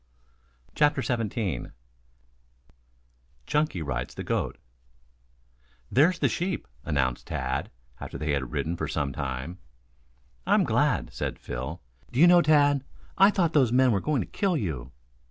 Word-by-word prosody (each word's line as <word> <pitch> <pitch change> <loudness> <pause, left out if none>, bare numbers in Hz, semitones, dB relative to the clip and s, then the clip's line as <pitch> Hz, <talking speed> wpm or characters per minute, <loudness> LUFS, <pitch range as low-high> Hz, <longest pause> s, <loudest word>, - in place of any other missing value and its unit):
CHAPTER 145 -3 +2
XVII 115 -5 -2 1.8
CHUNKY 150 - 0
RIDES 60 -4 -4
THE - - -5
GOAT - - -2 1.3
"There's 160 +7 +4
the - - +2
sheep," 180 +1 -2 0.2
announced 65 -4 -1
Tad, 65 0 -2 0.3
after - - -7
they 75 -1 -2
had 65 -4 -2
ridden 80 - -2
on 85 - -3
for - - -2
some 70 -2 -2
time. 65 +6 -4 0.9
"I'm - - +4
glad," - - +1
said - - -3
Phil, 65 +8 -6 0.3
"do 125 - -2
you 165 - +8
know, 175 0 +7
Tad, 145 -3 +4 0.4
I 195 +1 +8
thought 175 -6 +1
those 130 -6 +4
men 130 0 +4
were 100 -3 +1
going 145 -1 0
to - - -5
kill 190 -4 0
you." 70 - -4
115 Hz, 140 wpm, -27 LUFS, -, 1.8 s, you